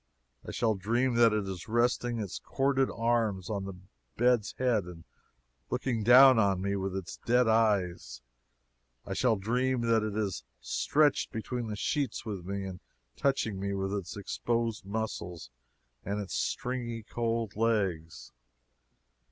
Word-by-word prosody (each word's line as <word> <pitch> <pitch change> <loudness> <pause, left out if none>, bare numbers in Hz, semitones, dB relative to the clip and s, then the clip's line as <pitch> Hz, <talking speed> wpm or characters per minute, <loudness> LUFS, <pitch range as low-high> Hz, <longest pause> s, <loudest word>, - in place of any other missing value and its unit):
I - - -9
shall 115 -2 +1
dream 120 +6 0
that 115 -1 +6
it 105 -2 -1
is 95 -2 -6
resting 120 +1 +1
its 105 -5 -4
corded 135 -1 +1
arms 115 -5 0
on 100 -2 -2
the 95 -1 -6 0.4
bed's 120 -2 +2
head 120 -7 +1
and 85 -2 -10 0.7
looking 120 -4 -1
down 125 +2 +8
on 100 -3 +2
me 100 +1 -1
with 95 -1 -3
its 95 -2 -5
dead 125 0 +2
eyes; 100 - +1 0.8
I 100 - -4
shall 115 +3 +2
dream 125 +5 0
that 115 -1 +3
it 105 -1 -3
is 95 - -2 0.2
stretched 150 -1 +1
between 120 +1 -4
the 105 - -4
sheets 135 +2 -2
with 100 -5 -5
me 100 +1 -3
and 95 -2 -6 0.4
touching 115 -8 0
me 100 0 -2
with 95 0 -2
its 100 -1 -4
exposed 115 +2 -2
muscles 90 - -4 0.5
and 100 +2 -2
its 100 -2 -5
stringy 120 -3 -2
cold 115 -1 -2
legs. 100 -8 -1
110 Hz, 145 wpm, -30 LUFS, 95-120 Hz, 0.8 s, down